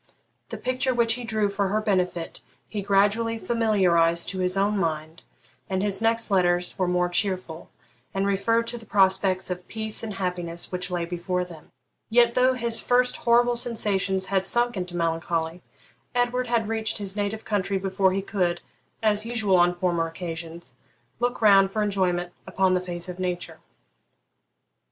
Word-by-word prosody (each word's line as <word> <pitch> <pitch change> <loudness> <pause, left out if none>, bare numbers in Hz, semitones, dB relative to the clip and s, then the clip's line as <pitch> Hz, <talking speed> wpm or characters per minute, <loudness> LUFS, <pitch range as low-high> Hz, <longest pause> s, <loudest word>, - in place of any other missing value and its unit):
The - - -5
picture 255 0 -1
which 230 -1 +3
he 245 +1 -5
drew 215 -2 0
for 200 0 -1
her 210 +3 0
benefit 180 -5 -1 0.3
he 210 - -4
gradually 205 +4 +2
familiarised 185 -8 +2
to 190 - -4
his 185 +1 0
own 200 +2 +2
mind, 160 -3 -2 0.5
and 190 0 -1
his 205 0 +1
next 225 -1 +1
letters 180 -2 +2
were 185 - +1
more 180 0 +1
cheerful, 180 -3 -2 0.4
and 195 0 -1
referred 230 +4 +1
to 240 - -6
the 225 - -13
prospects 190 -1 +2
of 180 0 -5
peace 220 -1 -3
and 215 -3 -5
happiness 175 -3 -3
which 180 0 -3
lay 175 -2 -2
before 180 +1 -2
them. 165 -4 -13 0.4
Yet, 235 +1 +4
though 255 +1 +3
his 235 -2 +1
first 250 0 +2
horrible 240 +1 +3
sensations 200 -5 0
had 190 -1 0
sunk 240 +1 +1
into 180 -2 -4
melancholy, 165 0 -1 0.5
Edward 245 +1 +1
had 235 -2 +1
reached 220 -1 -1
his 200 -2 -4
native 210 +1 -3
country 200 -2 0
before 190 0 +1
he 195 +1 -2
could, 180 -4 -1 0.4
as 215 0 +2
usual 220 -5 +1
on 175 0 +4
former 175 -2 -1
occasions, 165 -3 -7 0.5
look 245 -1 -1
round 195 -2 +6
for 215 +2 -1
enjoyment 180 -3 0
upon 190 0 +2
the 180 - +1
face 175 -1 -6
of 180 0 -7
nature. 180 -1 -3
195 Hz, 165 wpm, -25 LUFS, 180-220 Hz, 0.5 s, round